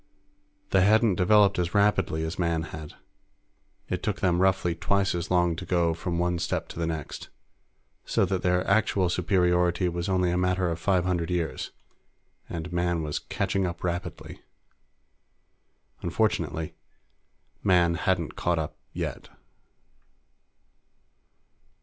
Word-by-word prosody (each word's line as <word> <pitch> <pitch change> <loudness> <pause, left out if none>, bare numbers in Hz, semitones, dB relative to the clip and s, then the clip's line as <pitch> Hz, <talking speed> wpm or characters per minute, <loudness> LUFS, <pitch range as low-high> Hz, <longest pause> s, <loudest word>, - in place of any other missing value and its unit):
They 95 - +4
hadn't 110 +1 +4
developed 100 +2 +4
as 90 +1 -1
rapidly 100 -6 +2
as 80 +3 -4
Man 85 -2 +1
had. 80 -2 -8 0.9
It - - -2
took - - -2
them 90 -1 +2
roughly 95 -2 +2
twice 100 +3 +1
as 85 +1 -3
long 90 -2 +2
to - - -5
go 85 -2 +1
from 85 +1 -3
one 90 0 0
step 85 - -2
to - - -8
the 85 - 0
next, 80 -3 -5 0.7
so - - +1
that 95 0 -1
their 90 -1 +1
actual 100 -2 +2
superiority 90 0 +2
was 85 +2 -3
only 90 -2 +2
a 90 - 0
matter 90 -1 +1
of 85 - -4
five 90 0 +1
hundred 90 -2 0
years, 85 -2 -2 0.8
and 85 +1 -5
Man 85 -1 0
was 75 -1 -2
catching 95 -2 -1
up 85 0 -6
rapidly. 85 0 -4 1.6
Unfortunately, 80 -1 -1 0.9
Man 90 -3 +4
hadn't 85 -1 -1
caught 85 -1 0
up 80 -1 -4 0.2
yet. - - -5
90 Hz, 130 wpm, -27 LUFS, 85-95 Hz, 1.6 s, They